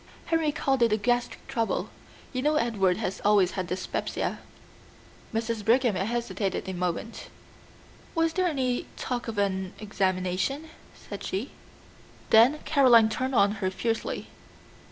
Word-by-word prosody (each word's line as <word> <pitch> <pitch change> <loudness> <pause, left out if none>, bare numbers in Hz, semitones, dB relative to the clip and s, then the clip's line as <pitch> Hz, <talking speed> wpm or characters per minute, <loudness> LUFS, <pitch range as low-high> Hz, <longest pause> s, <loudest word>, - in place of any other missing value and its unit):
"Henry 325 -2 +1
called 270 -3 0
it 220 -2 +3
gastric 245 0 0
trouble. 230 -1 -1 0.4
You 255 - -1
know 300 +3 +2
Edward 205 -9 +2
has 200 -3 -3
always 200 -3 +4
had 185 -2 -3
dyspepsia." 180 +1 -3 0.9
Mrs. 225 -1 -2
Brigham 240 +1 +3
hesitated 195 -2 -2
a 190 - -3
moment. 180 +5 -3 0.9
"Was 330 0 +2
there 370 -1 +1
any 260 -6 -1
talk 245 -1 -3
of 225 -2 -5
an 190 -2 -1
examination?" 195 - -1 0.2
said 200 - -9
she. 205 +8 -3 0.8
Then 240 +7 +6
Caroline 245 -7 +6
turned 260 +4 -2
on 200 -2 +5
her 185 - +1
fiercely. 225 +4 -2
225 Hz, 130 wpm, -27 LUFS, 195-255 Hz, 0.9 s, Then